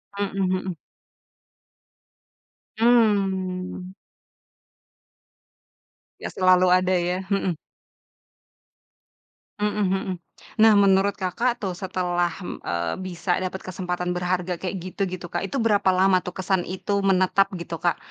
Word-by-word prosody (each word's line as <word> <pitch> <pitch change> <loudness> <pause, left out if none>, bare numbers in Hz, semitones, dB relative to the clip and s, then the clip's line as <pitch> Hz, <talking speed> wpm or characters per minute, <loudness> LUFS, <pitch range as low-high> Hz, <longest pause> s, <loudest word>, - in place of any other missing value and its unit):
Mhm 195 -1 -2
mhm. 185 -2 -3 2.0
Mmm. 190 -5 +1 2.3
Ya - - -5
selalu 185 -1 +4
ada 185 0 +3
ya. 180 +2 -1
Mhm. 190 -4 0 2.0
Mhm 210 0 0
mhm. 190 0 -1 0.5
Nah, 220 -1 +8
menurut 195 0 +3
Kakak 225 +6 -1
tuh 190 -3 -3
setelah, 175 -1 -1 0.2
mmm, - - -7
eee, 85 -1 -2
bisa 180 0 -2
dapet 185 0 -3
kesempatan 180 -1 -3
berharga 180 0 -1
kayak 190 0 -3
gitu-gitu 185 0 -4
Kak, 175 - -1
itu 275 - -3
berapa 210 -5 +2
lama 185 0 +4
tuh - - -5
kesan 190 -1 +1
itu 200 +3 -2
menetap 195 0 +3
gitu, 170 -1 -6
Kak? 175 - +1
185 Hz, 110 wpm, -24 LUFS, 180-195 Hz, 2.3 s, Nah